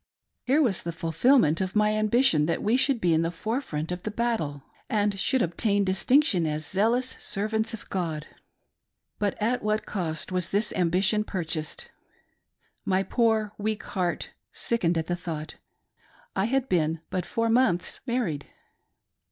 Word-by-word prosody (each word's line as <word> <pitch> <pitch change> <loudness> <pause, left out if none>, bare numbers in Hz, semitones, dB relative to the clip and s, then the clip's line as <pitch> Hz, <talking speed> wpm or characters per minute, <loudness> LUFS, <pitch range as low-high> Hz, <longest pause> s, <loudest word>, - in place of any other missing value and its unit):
Here 285 +5 +4
was 210 -9 +1
the 170 - -4
fulfilment 165 - +3
of 190 +1 -3
my 210 0 +3
ambition 215 - +3
that 170 - -1
we 220 +3 +3
should 265 -1 +2
be 175 -4 +2
in 160 - +3
the 165 - 0
forefront 175 - -3
of 180 0 -4
the 215 - -4
battle, 210 - -2 0.3
and 205 -2 +1
should 260 +5 +2
obtain 200 +4 +1
distinction 190 - +3
as 155 0 -2
zealous 230 +8 +1
servants 220 +3 -1
of 220 - -13
God. 160 -5 -2 0.9
But 205 -2 -1
at 235 +4 0
what 215 0 0
a - - -23
cost 170 -4 -3
was 180 -2 +1
this 210 +2 +2
ambition 185 +4 +2
purchased! 165 -6 -4 0.9
My 190 0 +1
poor, 220 -2 +1
weak 215 0 -2
heart 180 -3 -2 0.2
sickened 175 -8 0
at 160 - -1
the 175 - -1
thought 165 -3 -6 0.4
— - - -34 0.3
I 190 - +1
had 265 +3 0
been 160 -4 +1
but 185 - -1
four 230 0 0
months 185 -8 +2
married. 220 - -1
195 Hz, 160 wpm, -26 LUFS, 170-225 Hz, 0.9 s, Here